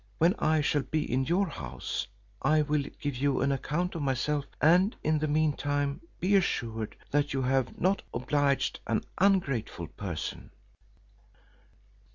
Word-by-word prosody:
When 170 - +4
I 155 0 +3
shall 145 0 +2
be 150 +4 -1
in 130 +2 0
your 185 +6 +2
house, 65 - -4 0.3
I 155 +3 +4
will 150 -1 0
give 145 -2 -2
you 140 +1 +1
an 140 +1 +2
account 150 +6 -1
of 165 - -4
myself; 140 +1 0
and 180 +7 +4
in 155 0 +2
the 155 - 0
mean 155 0 +2
time 145 0 -1 0.2
be 190 +4 +3
assured 115 - 0 0.2
that 145 -1 +1
you 135 - 0
have 130 0 0
not 190 +3 +2
obliged 140 +2 +1
an - - 0 0.2
ungrateful 140 - +1
person." 90 -2 -5
145 Hz, 150 wpm, -29 LUFS, 130-155 Hz, 0.3 s, When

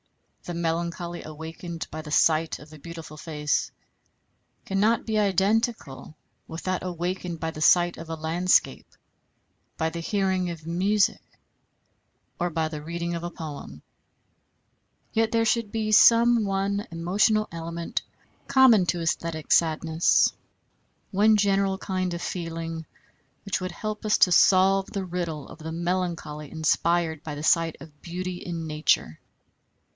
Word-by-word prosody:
The 175 - -5
melancholy 170 +1 -2
awakened 160 +2 -7
by 155 - -5
the 155 - -10
sight 160 +1 +3
of 150 +1 -14
a 155 - -12
beautiful 165 -1 -9
face 150 -2 -2 0.9
cannot 210 +4 +1
be 220 -1 0
identical 200 - 0 0.3
with 160 +1 -7
that 185 -1 -1
awakened 180 -1 -4
by 160 0 -2
the 155 - -9
sight 175 +2 +4
of 165 0 -9
a 165 - -3
landscape, 165 +3 +1 0.9
by 160 0 0
the 170 - -5
hearing 190 0 0
of 165 -2 -8
music, 195 +6 +1 1.2
or 175 0 0
by 160 -1 -1
the 155 -1 -6
reading 170 +2 -4
of 170 0 -4
a 175 - -3
poem. 145 - -8 1.3
Yet 225 0 +2
there 230 0 +2
should 225 -2 +1
be 215 -1 -1
some 235 +1 +6
one 200 +1 -1
emotional 195 +6 +1
element 170 0 -4 0.5
common 240 -9 +5
to 175 - +1
æsthetic 165 -1 -1
sadness, 160 0 +3 0.8
one 210 +2 +4
general 195 -1 +2
kind 185 -2 -2
of 170 - -6
feeling 165 -2 -5 0.6
which 195 -1 -1
would 185 - -3
help 215 -1 -5
us 215 -1 +3
to 180 - +5
solve 190 +2 +5
the 195 -2 -4
riddle 170 -5 -4
of - - -13
the 160 +1 -6
melancholy 170 -4 -3
inspired 160 0 +1
by 150 -2 -5
the 145 - -6
sight 165 0 +2
of 150 0 -14
beauty 180 +1 -5
in 170 -2 -5
Nature. 150 - 0
170 Hz, 140 wpm, -26 LUFS, 160-195 Hz, 1.3 s, some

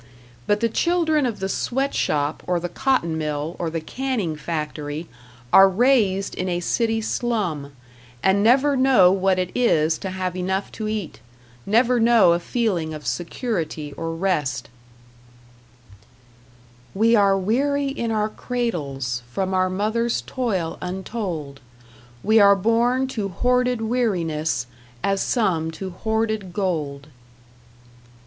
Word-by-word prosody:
But 205 +1 +2
the 230 - +3
children 315 +2 +1
of 230 - -4
the 190 - -2
sweat 270 +7 -1
shop 145 0 0
or 180 -1 +1
the 175 - -3
cotton 175 -8 0
mill 150 +2 -3
or 170 - -1
the 165 +1 -3
canning 220 -3 -3
factory 150 0 -4 0.5
are 195 0 +8
raised 200 -3 +2
in 185 0 -3
a 175 -1 -1
city 225 +5 0
slum, 195 - -2 0.5
and 195 +1 +3
never 265 +6 +4
know 255 -9 +5
what 190 -1 +2
it 185 -1 -1
is 160 -10 +2
to 190 - -4
have 185 -1 -3
enough 190 +2 -2
to 215 - -5
eat, 215 -5 -4 0.5
never 240 +4 +3
know 225 -6 +5
a 170 - 0
feeling 175 -6 -1
of 150 - -10
security 165 - -3
or 165 0 -4
rest 165 -7 -1 2.3
We 225 +3 +4
are 200 -2 +4
weary 280 +9 +1
in 235 -4 -3
our 215 -1 0
cradles 140 - -3
From 190 +7 -2
our 185 0 +2
mother's 220 +5 0
toil 195 -11 -2
untold; 180 -6 -5 0.6
We 220 +2 +5
are 200 -1 +7
born 235 +6 +2
to 215 -6 -3
hoarded 250 +4 +1
weariness 175 - -1 0.4
As 195 -1 +1
some 180 -9 0
to 190 +3 -6
hoarded 220 -1 -2
gold. 150 -8 -2
195 Hz, 130 wpm, -22 LUFS, 165-230 Hz, 2.3 s, are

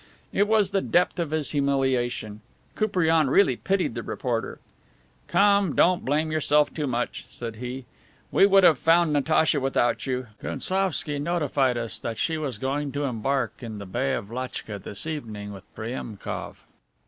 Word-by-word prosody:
It 205 +1 +3
was 210 -3 +3
the 195 -1 +1
depth 180 0 +1
of 170 -3 -1
his 155 -1 0
humiliation; 130 -6 0 0.3
Koupriane 165 -8 +2
really 140 -4 +4
pitied 195 +7 0
the - - -4
reporter. - - -3 0.7
"Come, 200 -5 +3
don't 180 0 +3
blame 155 +3 0
yourself 150 -1 +2
too 150 -3 -2
much," 120 -1 -2
said 115 -2 -7
he. 125 +2 -6 0.5
"We 195 - +6
would 195 -1 +5
have 160 -7 +6
found 165 -1 +4
Natacha 150 +1 +2
without 135 -1 0
you; 130 -1 -2 0.2
Gounsovski 185 -6 0
notified 145 -5 +1
us 115 -1 -3
that 115 - -4
she 160 -1 0
was 135 -7 -3
going 140 +4 -2
to 145 +1 -2
embark 130 -1 -1
in 115 -3 -6
the 100 - -7
Bay 130 +8 -1
of 105 -1 -6
Lachtka 120 -4 -5
this 100 +5 -6
evening 110 -10 -5
with 95 -1 -11
Priemkof." 110 -2 -5
140 Hz, 160 wpm, -25 LUFS, 120-165 Hz, 0.7 s, We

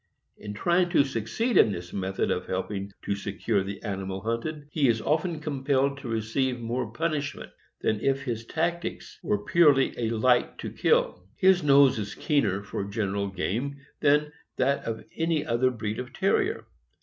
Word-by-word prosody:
In 105 -1 -8
trying 175 - +2
to 145 - +6
succeed 135 - -1
in 105 - +6
this 90 -2 -6
method 95 0 -1
of 90 - -2
helping 100 +1 -3
to 100 - -1
secure 100 +1 -1
the 100 +1 -6
animal 95 -2 -3
hunted, 140 +8 -3
he 145 -3 +2
is 115 -2 +2
often 155 +6 0
compelled 140 -2 0
to 140 - -8
receive 115 +3 -1
more 120 0 -3
punishment 150 0 -3 0.3
than 110 - +1
if 135 +1 +1
his 115 -4 -3
tactics 170 +2 -3
were 105 0 -1
purely 145 -6 +4
a 115 -2 0
light 120 +2 +2
to - - -6
kill. 90 +1 +1
His 185 -1 +5
nose 140 -4 +5
is 100 -1 -5
keener 100 - +1
for 100 0 -4
general 100 -1 -2
game 110 +9 -2 0.2
than 150 +1 +3 0.2
that 140 +2 +1
of 110 -1 -4
any 165 -2 0
other 120 +2 +2
breed 110 -2 -4
of 125 -1 -6
Terrier. 380 - +1
125 Hz, 165 wpm, -27 LUFS, 105-145 Hz, 0.3 s, to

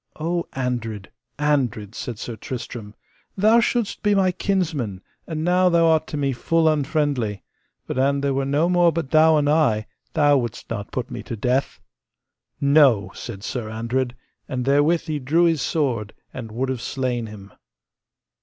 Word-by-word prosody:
O 170 +2 -1
Andred, 115 -6 -3 0.3
Andred, 130 -8 0
said 120 -1 -5
Sir 120 0 -6
Tristram, 115 -3 -7 0.4
thou 215 +4 +5
shouldst 235 -2 0
be 205 -1 +2
my 190 -2 +3
kinsman, 160 - -1 0.3
and 160 -2 -3
now 180 +1 +3
thou 170 -1 +4
art 160 -1 +3
to 150 - -4
me 140 -2 0
full 165 +6 +1
unfriendly, 145 - 0 0.4
but - - -3
an 140 +1 +2
there 140 -1 0
were 135 +1 0
no 145 +5 +2
more 175 -1 +4
but 160 -4 -4
thou 160 0 +6
and 145 -1 +1
I, 145 -9 +2 0.3
thou 145 -3 +4
wouldst 120 -1 -6
not 105 -3 -4
put 125 - -4
me - - -5
to 115 - -6
death. 125 +5 -1 0.8
No! 140 -7 +4
said 100 -5 -8
Sir 120 -3 -4
Andred, 120 +3 -2 0.3
and 125 -2 -2
therewith 145 +5 +3
he 155 -3 -3
drew 150 +6 +2
his 165 -4 +2
sword, 120 -9 -1 0.2
and 115 -4 -7
would 130 +4 -2
have 130 -3 -3
slain 125 -3 -2
him. 100 -2 -12
140 Hz, 165 wpm, -22 LUFS, 120-160 Hz, 0.8 s, thou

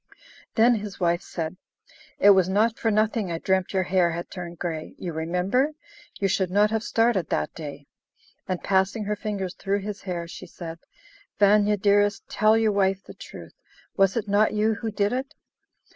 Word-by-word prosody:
Then 235 +2 +5
his 205 -1 -7
wife 175 -1 +1
said, 165 +1 -5 0.6
"It 205 - +7
was 190 -2 +4
not 220 +4 +2
for 225 - +1
nothing 215 -2 +1
I 165 - -1
dreamt 190 +2 0
your 190 -1 +1
hair 180 -1 +2
had 170 +1 -6
turned 175 -2 -7
grey. 160 -2 -5
You 175 -3 -5
remember? 180 - 0 0.5
You 195 - +2
should 190 -1 0
not 205 +3 +3
have 220 -1 0
started 225 -7 +1
that - - -1
day." 145 -3 -8 0.6
And 185 -2 -3
passing 195 +3 +1
her 210 +1 -1
fingers 200 -3 -4
through 200 0 -2
his 205 0 -6
hair, 175 -3 -4
she - - -9
said: 165 -1 -8 0.6
"Vanya 205 0 +4
dearest, 205 +1 +2
tell 215 +1 +3
your 220 -1 +2
wife 195 -1 +1
the - - -11
truth; - - -11 0.4
was 195 +2 +3
it 220 - -2
not 210 +2 +2
you 215 +1 +2
who 225 +1 -4
did 205 +1 0
it?" 260 +2 -4
200 Hz, 180 wpm, -25 LUFS, 180-215 Hz, 0.6 s, It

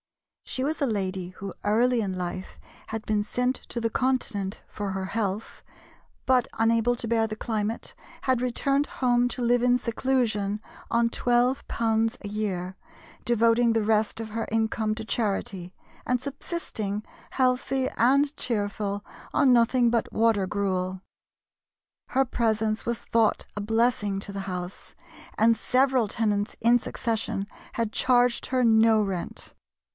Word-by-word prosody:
She 260 - -3
was 305 +1 -2
a 280 - +3
lady 190 -4 -2
who 195 +1 -7
early 235 +3 +3
in 190 -3 -3
life 180 +1 -5 0.3
had 220 0 -5
been 210 -1 +1
sent 250 +4 0
to 235 - -2
the 230 -1 -1
Continent 220 -7 -1
for 205 -1 -4
her 190 0 -3
health, 205 0 -3 0.6
but 255 -2 +3
unable 230 +1 +3
to 230 - -4
bear 225 -1 +2
the 215 0 -6
climate, 220 0 -3 0.3
had 255 -2 +2
returned 275 +3 +1
home 245 -1 +3
to 245 - -3
live 240 0 +3
in 250 0 +4
seclusion 230 -4 0 0.3
on 230 0 +2
£12 240 -2 +1
a - - -7
year, 190 -3 -3 0.5
devoting 230 0 +3
the 225 -1 +1
rest 215 0 +1
of 220 -1 -5
her 225 +1 -2
income 220 -1 0
to 220 0 -6
charity, 195 -5 -2 0.3
and 250 0 +1
subsisting, 255 - -4 0.2
healthy 260 0 +1
and 280 +5 +3
cheerful, 205 -3 -2 0.3
on 270 -4 +5
nothing 240 +1 +4
but 230 -1 0
water 220 -4 +2
gruel. 185 -2 -1 1.1
Her 270 +1 +2
presence 220 -3 0
was 235 0 -1
thought 225 -1 +1
a 205 - -3
blessing 220 -2 +1
to 200 - -7
the 195 - -3
house, 180 -1 -6 0.4
and 230 +1 +5
several 255 +1 +2
tenants 205 -1 0
in 235 +2 +5
succession 220 -4 -2 0.3
had 225 -2 -2
charged 245 -1 +3
her 255 -1 +1
no 220 -1 +5
rent. 190 -4 -4
225 Hz, 140 wpm, -26 LUFS, 205-245 Hz, 1.1 s, on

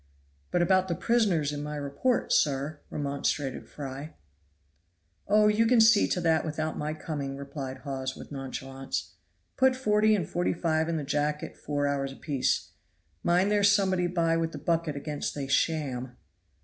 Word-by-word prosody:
"But 175 - +2
about 185 +1 +3
the 170 - -1
prisoners 190 -10 +2
in 145 0 -4
my 150 0 -4
report, 145 - 0
sir," 145 +1 +1
remonstrated 140 -1 -2
Fry. 140 +2 -7 1.1
"Oh, 210 +1 +5
you 215 +2 +3
can 245 0 +5
see 225 -1 +6
to 180 - -1
that 160 -2 +3
without 155 0 -3
my 150 +1 -3
coming," 140 -4 -4
replied 140 -1 -6
Hawes 130 -2 -3
with - - -11
nonchalance. 135 -1 -5 0.4
"Put 260 0 +4
40 215 -3 +3
and 180 -6 -2
45 165 -2 0
in 165 - 0
the 150 - -3
jacket 150 +1 -1
four 145 -1 -2
hours 140 -1 -1
apiece. 135 -1 -1 0.5
Mind 180 +4 +2
there's 205 -1 +5
somebody 190 -3 +2
by 170 -2 +1
with 165 0 -1
the - - -5
bucket 165 0 0
against 145 +1 -4
they 140 -2 -3
sham." 135 -4 -1
155 Hz, 155 wpm, -28 LUFS, 140-180 Hz, 1.1 s, see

